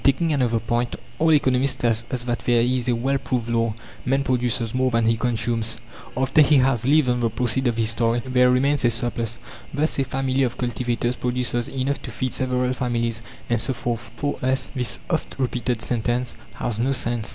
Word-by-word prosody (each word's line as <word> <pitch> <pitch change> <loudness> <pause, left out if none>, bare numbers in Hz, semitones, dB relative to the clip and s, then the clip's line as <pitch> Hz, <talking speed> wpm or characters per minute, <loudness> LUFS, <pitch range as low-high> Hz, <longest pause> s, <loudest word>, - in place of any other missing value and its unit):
Taking 155 +4 +3
another 125 -5 +2
point 120 +2 -1 0.2
all 160 +1 +4
economists 135 -2 +3
tell 120 -3 +1
us 110 0 +1 0.2
that 120 -1 -1
there 120 -1 +2
is 125 0 0
a 120 - +3
well 135 +4 0
proved 125 -3 -2
law: 115 -2 +1 0.3
"Man 135 +2 +1
produces 125 -3 0
more 130 0 +2
than 115 -2 +1
he 115 0 +3
consumes." 115 -1 -1 0.4
After 130 +4 +4
he 150 0 +5
has 130 -3 +3
lived 150 -1 +4
on 125 0 +1
the 115 -1 +1
proceeds 125 +3 0
of 120 -1 0
his 115 0 +2
toil, 115 +1 +1
there 125 -1 +4
remains 135 +2 +2
a 120 - +5
surplus. 115 0 -2 0.3
Thus, 150 +1 0
a - - +3
family 135 0 -1
of 125 -2 0
cultivators 120 0 -1
produces 125 -1 -1
enough 135 +1 -2
to - - -7
feed 130 -2 -3
several 125 0 0
families, 120 -3 -1 0.3
and 120 -2 +1
so 130 - 0
forth. 120 -1 -3
For 145 0 -2
us, 130 +1 0
this 125 -2 -1
oft - - -2
repeated 125 -3 -1
sentence 120 +2 -1 0.2
has 115 -2 -3
no 130 +4 +1
sense. 120 -3 -1
125 Hz, 195 wpm, -23 LUFS, 115-130 Hz, 0.4 s, he